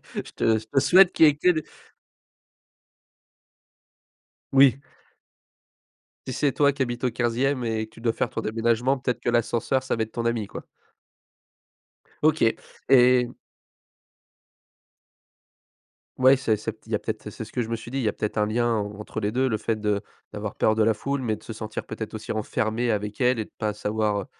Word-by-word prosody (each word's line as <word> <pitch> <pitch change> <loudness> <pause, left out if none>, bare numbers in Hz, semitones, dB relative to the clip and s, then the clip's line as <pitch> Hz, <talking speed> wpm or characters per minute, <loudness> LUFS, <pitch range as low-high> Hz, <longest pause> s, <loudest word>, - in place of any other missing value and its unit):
Je - - -1
te 110 -1 +2
je 110 - -7
te 135 +5 +1
souhaite 180 +7 +6
qu'il 160 - +6
y - - +8
ait 145 - -1
que 180 - +3
des 155 -3 -2 2.9
Oui. 135 -1 +6 1.5
Si, 130 - -3
c'est 140 +2 +1
toi 140 +1 +3
qui 140 - -5
habite 120 0 -2
au 125 - +1
15e 125 +3 0
et 110 -1 -1
que - - -28
tu 115 - -14
dois 115 - +2
faire - - -1
ton - - -4
déménagement, 115 +4 +1
peut-être 125 -2 -2
que - - -1
l'ascenseur, 120 +2 +1
ça 130 - -1
va 110 - 0
être 110 - -8
ton 115 - -4
ami, 115 -3 0
quoi. - - -9 1.6
OK, 155 +1 +3 0.5
et 125 -2 +5 2.9
Ouais, 130 +1 +6
c'est 110 -5 0
c'est 110 +1 -5
il 110 - -13
y - - +2
a - - -1
peut-être, 110 -1 -5
c'est 110 - -7
ce - - -14
que 125 - 0
je 115 - -4
me 115 - -1
suis 120 +2 -10
dit, 135 - -3
il - - -1
y 110 - +1
a - - -3
peut-être 105 - -4
un 105 - +3
lien 120 +2 0
en 105 -1 -3
entre 110 +1 -6
les 105 +1 0
2, 130 +2 +1
le 110 -4 0
fait 110 +1 -2
de 105 -1 0 0.3
d'avoir 105 0 -5
peur 110 - +2
de 110 - +3
la 110 0 +3
foule 140 +5 -3
mais 110 -3 -1
de - - -20
se 110 - -7
sentir, 110 0 -6
peut-être, 110 0 -6
aussi 110 0 -5
renfermé 110 +2 -1
avec 105 +2 -3
elle 125 -1 +3
et 110 - -2
de - - -24
pas 105 -2 -1
savoir, 105 0 -1
heu - - -9
115 Hz, 200 wpm, -25 LUFS, 110-130 Hz, 2.9 s, y